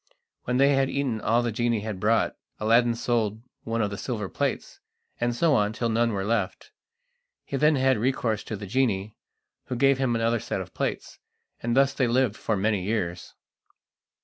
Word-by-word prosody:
When 125 Hz, 0 st, 0 dB
they 140 Hz, +1 st, +5 dB
had 135 Hz, 0 st, +2 dB
eaten 130 Hz, -6 st, -1 dB
all 115 Hz, +3 st, +2 dB
the 120 Hz, -, -1 dB
genie 120 Hz, -1 st, 0 dB
had 105 Hz, -3 st, -5 dB
brought, 110 Hz, +3 st, +2 dB, 0.2 s
Aladdin 115 Hz, +2 st, +3 dB
sold 115 Hz, -2 st, -1 dB, 0.2 s
one 115 Hz, 0 st, 0 dB
of 100 Hz, -, -1 dB
the 100 Hz, -, -5 dB
silver 110 Hz, -6 st, -3 dB
plates, -, -, -3 dB, 0.4 s
and 120 Hz, 0 st, 0 dB
so 160 Hz, +4 st, +3 dB
on 105 Hz, -4 st, +2 dB
till 115 Hz, 0 st, -1 dB
none 115 Hz, +1 st, +2 dB
were 100 Hz, -2 st, -2 dB
left. 105 Hz, -3 st, -2 dB, 0.7 s
He -, -, -4 dB
then 150 Hz, +3 st, +4 dB
had 130 Hz, -3 st, +2 dB
recourse 115 Hz, -3 st, 0 dB
to 110 Hz, -, -4 dB
the 105 Hz, 0 st, -7 dB
genie, 105 Hz, -2 st, 0 dB, 0.5 s
who 125 Hz, -, -4 dB
gave 135 Hz, +1 st, +3 dB
him 130 Hz, -3 st, +1 dB
another 115 Hz, +1 st, +1 dB
set -, -, -3 dB
of -, -, -8 dB
plates, -, -, -4 dB, 0.4 s
and 120 Hz, +1 st, -1 dB
thus 135 Hz, 0 st, +4 dB
they 130 Hz, -, +1 dB
lived 120 Hz, -2 st, +2 dB
for 110 Hz, -1 st, -1 dB
many 105 Hz, 0 st, +1 dB
years. 90 Hz, -3 st, -3 dB
115 Hz, 185 wpm, -26 LUFS, 105-125 Hz, 0.7 s, they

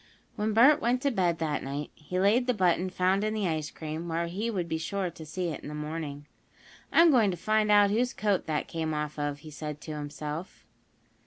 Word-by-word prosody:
When 215 Hz, 0 st, -1 dB
Bert 285 Hz, +7 st, +6 dB
went 245 Hz, +2 st, +2 dB
to 280 Hz, -, +2 dB
bed 180 Hz, -7 st, +1 dB
that 155 Hz, -2 st, -1 dB
night 140 Hz, +2 st, -5 dB
he 180 Hz, +4 st, -4 dB
laid 220 Hz, +6 st, +3 dB
the 250 Hz, -, +2 dB
button 185 Hz, -1 st, +2 dB
found 185 Hz, +2 st, +1 dB
in 215 Hz, 0 st, -1 dB
the 210 Hz, -3 st, 0 dB
ice 155 Hz, -2 st, -2 dB
cream 160 Hz, +2 st, -6 dB
where 165 Hz, 0 st, -1 dB
he 195 Hz, +7 st, -3 dB
would 185 Hz, -6 st, -2 dB
be 160 Hz, -1 st, -2 dB
sure 190 Hz, +1 st, -2 dB
to 160 Hz, -1 st, -10 dB
see 175 Hz, +3 st, -2 dB
it 155 Hz, -, -4 dB
in -, -, -10 dB
the 150 Hz, -, -6 dB
morning. 150 Hz, -1 st, -5 dB, 0.7 s
"I'm 335 Hz, 0 st, +7 dB
going 230 Hz, -7 st, +4 dB
to 180 Hz, -, -3 dB
find 215 Hz, +4 st, +1 dB
out 205 Hz, -1 st, +6 dB
whose 245 Hz, +4 st, +1 dB
coat 205 Hz, -3 st, 0 dB
that 155 Hz, -2 st, -1 dB
came 160 Hz, -2 st, -2 dB
off 150 Hz, 0 st, -3 dB
of," 145 Hz, 0 st, -2 dB
he 155 Hz, -, -9 dB
said 150 Hz, 0 st, -6 dB
to 155 Hz, -, -7 dB
himself. 150 Hz, +3 st, -6 dB
175 Hz, 225 wpm, -29 LUFS, 155-210 Hz, 0.7 s, I'm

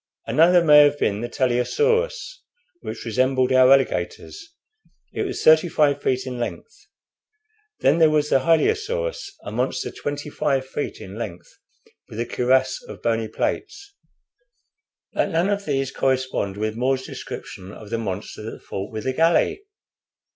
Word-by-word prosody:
Another 175 Hz, +2 st, +4 dB
may 150 Hz, -2 st, +7 dB
have 145 Hz, 0 st, +5 dB
been 105 Hz, -6 st, 0 dB
the 120 Hz, -, -4 dB
Teleosaurus, 465 Hz, -, 0 dB, 0.4 s
which -, -, -7 dB
resembled 130 Hz, +2 st, +1 dB
our 130 Hz, 0 st, +6 dB
alligators. 230 Hz, -, 0 dB, 0.6 s
It -, -, -3 dB
was 380 Hz, -, -5 dB
thirty 160 Hz, +2 st, +6 dB
five 145 Hz, -3 st, +2 dB
feet 130 Hz, 0 st, 0 dB
in 125 Hz, -2 st, -5 dB
length. 120 Hz, -, -7 dB, 0.9 s
Then 145 Hz, +5 st, +3 dB
there 160 Hz, -1 st, +6 dB
was 150 Hz, -1 st, +1 dB
the -, -, +5 dB
Hylaeosaurus, 445 Hz, -, 0 dB
a -, -, -6 dB
monster 125 Hz, +3 st, -2 dB
twenty 145 Hz, +1 st, -5 dB
five 135 Hz, -3 st, 0 dB
feet 140 Hz, +2 st, -5 dB
in 95 Hz, +4 st, -9 dB
length, 95 Hz, -6 st, -7 dB, 0.5 s
with 110 Hz, -, -8 dB
a 120 Hz, -, 0 dB
cuirass 130 Hz, +2 st, +1 dB
of -, -, -12 dB
bony 115 Hz, -1 st, 0 dB
plates." 400 Hz, -, -4 dB, 1.2 s
"But -, -, 0 dB
none 170 Hz, +4 st, +1 dB
of 200 Hz, 0 st, -2 dB
these 135 Hz, -2 st, -1 dB
correspond 130 Hz, -7 st, -1 dB
with 110 Hz, +1 st, -2 dB
More's 130 Hz, +2 st, 0 dB
description 95 Hz, -6 st, -8 dB
of 105 Hz, +1 st, -12 dB
the 115 Hz, -, -1 dB
monster 100 Hz, -1 st, -5 dB
that -, -, -11 dB
fought 95 Hz, +1 st, -6 dB
with 110 Hz, -1 st, -5 dB
the 130 Hz, -, -1 dB
galley." 165 Hz, -, +2 dB
135 Hz, 150 wpm, -22 LUFS, 120-165 Hz, 1.2 s, may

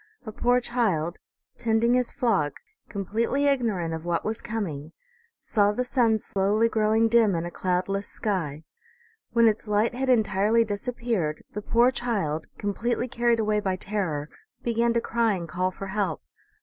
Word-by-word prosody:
A 220 Hz, -, -5 dB
poor 245 Hz, +3 st, +2 dB
child, 200 Hz, -10 st, -1 dB, 0.4 s
tending 230 Hz, +1 st, +2 dB
his 250 Hz, -1 st, +1 dB
flock, 200 Hz, -12 st, +1 dB, 0.4 s
completely 225 Hz, +7 st, -1 dB
ignorant 220 Hz, -12 st, +1 dB
of 160 Hz, 0 st, -5 dB
what 170 Hz, -1 st, -1 dB
was 220 Hz, +1 st, -2 dB
coming, 170 Hz, -9 st, -4 dB, 0.5 s
saw 205 Hz, -1 st, +2 dB
the 250 Hz, +4 st, -1 dB
sun 240 Hz, -3 st, +2 dB
slowly 205 Hz, +2 st, +1 dB
growing 220 Hz, 0 st, +2 dB
dim 225 Hz, -4 st, +4 dB
in 165 Hz, 0 st, -2 dB
a 175 Hz, -, -5 dB
cloud 180 Hz, 0 st, -1 dB
less 195 Hz, +1 st, -2 dB
sky. 165 Hz, -8 st, -3 dB, 0.7 s
When 230 Hz, 0 st, +5 dB
its 220 Hz, 0 st, 0 dB
light 210 Hz, +3 st, +2 dB
had 260 Hz, +2 st, -2 dB
entirely 220 Hz, -1 st, +3 dB
disappeared 215 Hz, -6 st, -2 dB
the 210 Hz, -, -4 dB
poor 235 Hz, +4 st, +3 dB
child, 200 Hz, -12 st, -2 dB
completely 230 Hz, +5 st, -1 dB
carried 235 Hz, -1 st, +1 dB
away 210 Hz, -1 st, +1 dB
by 190 Hz, -3 st, -1 dB
terror, 180 Hz, -7 st, -3 dB, 0.3 s
began 235 Hz, 0 st, +1 dB
to 235 Hz, -, +1 dB
cry 230 Hz, -3 st, +1 dB
and 170 Hz, -2 st, -5 dB
call 185 Hz, +3 st, -1 dB
for 190 Hz, +1 st, -8 dB
help. 190 Hz, -5 st, -2 dB
215 Hz, 160 wpm, -26 LUFS, 185-235 Hz, 0.7 s, When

